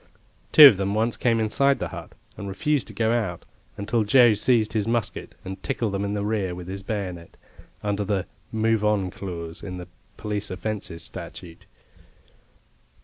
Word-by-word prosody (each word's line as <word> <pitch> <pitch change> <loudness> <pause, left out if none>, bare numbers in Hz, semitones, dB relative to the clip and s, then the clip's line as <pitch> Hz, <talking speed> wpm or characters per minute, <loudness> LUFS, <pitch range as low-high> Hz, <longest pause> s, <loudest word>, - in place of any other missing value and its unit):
Two 150 - +11
of 115 -9 +9
them 100 +1 -1
once 115 +2 +1
came 115 -2 +1
inside 135 +6 +2
the - - -4
hut - - -9 0.2
and 100 - -7
refused 150 +8 0
to - - -9
go 110 -1 +1
out, 105 -8 -2 0.3
until 110 +2 0
Joe 120 +1 +6
seized 110 +1 +2
his 110 -1 0
musket, 115 -2 -2
and 95 0 -7
tickled 100 +4 -2
them 100 0 -1
in 100 0 -2
the 100 0 -2
rear 100 -4 -1
with 90 0 -8
his 95 +1 -5
bayonet, 95 -5 -5 0.5
under 105 0 -1
the 100 -2 -1 0.3
"move 110 -1 +1
on" 105 -3 +1
clause 85 -5 -7
in 90 -2 -6
the 90 -1 -8 0.3
Police 105 -1 -2
Offences 95 -3 -4
Statute. 85 -1 -8
105 Hz, 170 wpm, -24 LUFS, 95-110 Hz, 0.5 s, Two